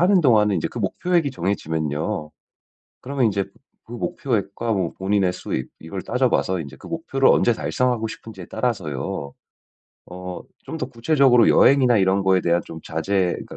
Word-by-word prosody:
하는 185 +1 +5
동안은 105 - +4
이제 - - -1
그 120 - -8
목표액이 160 - 0
정해지면요 80 - -2 0.7
그러면 135 -1 0
이제 100 -2 0 0.4
그 115 - -13
목표액과 115 -2 -2
뭐 95 -5 -1
본인의 95 -1 +1
수익 65 -7 -4
이걸 90 +4 -6
따져봐서 120 -7 +1
이제 70 -3 -8
그 - - -13
목표를 160 -5 +1
언제 120 - +4
달성하고 125 -1 0
싶은지에 105 -4 -9
따라서요 75 - -3 0.7
어 90 0 -7 0.2
좀 - - -6
더 125 - -2
구체적으로 125 -1 +4
여행이나 130 -3 +5
이런 95 0 +2
거에 95 -1 +4
대한 85 0 +2
좀 80 - -9
자제 90 +3 0
그러니까 - - -10
105 Hz, 370 characters per minute, -22 LUFS, 90-125 Hz, 0.7 s, 하는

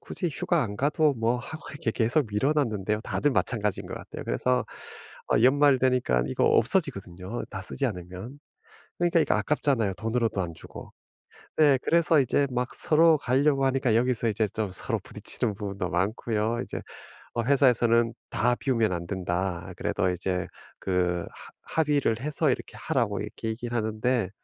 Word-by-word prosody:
굳이 180 - -3
휴가 175 +2 +1
안 105 -3 -4
가도 150 +3 +2
뭐 115 0 +1
하고 155 +6 -8
해 - - -10
이렇게 135 -5 -2
계속 120 +6 +1
미뤄 105 +8 +1
놨는데요. 105 -7 0
다들 145 +3 0
마찬가지인 105 -6 -1
것 - - -6
같아요. - - -8
그래서 125 0 0 0.6
아 - - +3
연말 140 +1 +5
되니깐 125 - +2
이거 65 - 0
없어지거든요 110 - 0
다 100 - -5
쓰지 135 - -2
않으면. 95 +5 -7 0.6
그러니까 175 -1 +3
이거 - - +2
아깝잖아요 130 -9 +1
돈으로도 115 -1 -1
안 85 - -4
주고. 80 - -11 0.7
네 145 -3 +5
그래서 165 -2 +4
이제 140 +2 +2
막 125 0 -2
서로 160 0 +5
가려고 135 +1 +2
하니까 135 -3 +2
여기서 120 0 +1
이제 110 0 0
좀 110 -2 -3
서로 - - -2
부딪히는 105 - -3
부분도 100 -2 -4
많고요. 110 +5 -1
이제 - - -6 0.5
어 120 - -1
회사에서는 120 -3 +3 0.2
"다 120 +3 +1
비우면 115 -6 +1
안 85 -1 -4
된다." 90 -1 -2
아 90 - -8
그래도 90 - 0
이제 90 0 -2 0.3
그 90 -2 0
합 - - -14
합의를 145 -8 +1
해서 150 +2 +1
이렇게 - - -5
하라고 - - -1
이렇게 115 - -5
얘기를 120 +2 -4
하는데 110 -1 0
115 Hz, 370 characters per minute, -27 LUFS, 100-140 Hz, 0.7 s, 연말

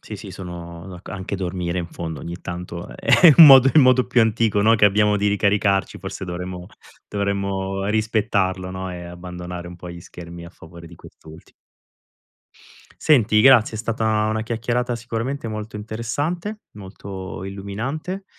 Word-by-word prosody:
Sì, - - -8
sì - - -10
sono 85 -1 -9
d'ac 90 -2 -11
anche 95 0 -5
dormire, 90 -1 -3
in 85 - -3
fondo, 80 -4 -7
ogni 85 +4 -6
tanto 90 -1 -7
è - - -11
è 160 -6 +8
un 165 - +11
modo 135 -1 +9
i - - +7
modo 130 -2 +5
più 120 - +2
antico, 110 -2 +1
no, 115 +2 +5
che 105 - +3
abbiamo 105 +1 +2
di 105 +1 +1
ricaricarci, 100 -1 +1
forse - - -7
dovremmo 90 0 -6 0.4
dovremmo 100 -1 -2
rispettarlo, 105 -4 0
no, 95 0 -5
e 90 -1 -7
abbandonare 90 0 -8
un 90 - -10
po' 90 0 -9
gli 85 0 -10
schermi 85 0 -11
a - - -12
favore 85 0 -14
di - - -13
quest'ultimo. 80 +1 -16 1.5
Senti, 115 -8 +4
grazie, 120 -3 +5
è - - -6
stata 110 -1 0
una 110 0 -1
chiacchierata 120 +2 -2
sicuramente 115 +2 -4
molto 110 0 -6
interessante, 145 - -4
molto 95 -2 -8
illuminante, 120 - -5
100 Hz, 160 wpm, -21 LUFS, 90-115 Hz, 1.5 s, un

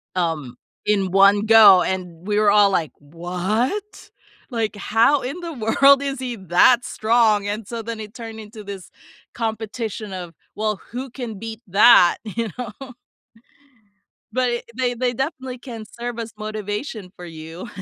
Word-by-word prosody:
um, 160 -8 -2 0.3
in 195 -3 +1
1 200 +2 +5
go, 215 -4 +8
and 180 -1 -4
we 210 0 0
were 210 -1 +4
all, 205 -1 +5
like, 170 -6 -1
"What? 180 - -3 0.4
Like, 225 -4 -2
how 230 +7 +2
in 275 +8 -5
the 340 -2 -6
world 275 +3 +4
is 275 -1 -3
he 250 -2 -4
that 190 +6 +4
strong?" 220 -2 +2
and 210 +1 -3
so 235 -1 -5
then, 225 0 -6
it 210 -1 -9
turned 225 -2 -8
into 215 0 -11
this 195 -2 -9 0.4
competition 220 -2 -4
of, 175 -2 -7 0.2
"Well, 215 -1 -2
who 255 +3 -5
can 230 -5 -7
beat 225 +1 -7
that," 195 -2 +6
you 225 +1 -3
know? 250 +2 -8 1.4
But, 255 -1 +1
i 240 0 -2
they 250 -1 0
they 245 +1 -1
definitely 265 -1 -4
can 235 -3 -9
serve 240 0 -4
as 225 -2 -6
motivation 215 -1 -5
for 180 - -10
you. 165 +4 -9
220 Hz, 155 wpm, -21 LUFS, 195-245 Hz, 1.4 s, go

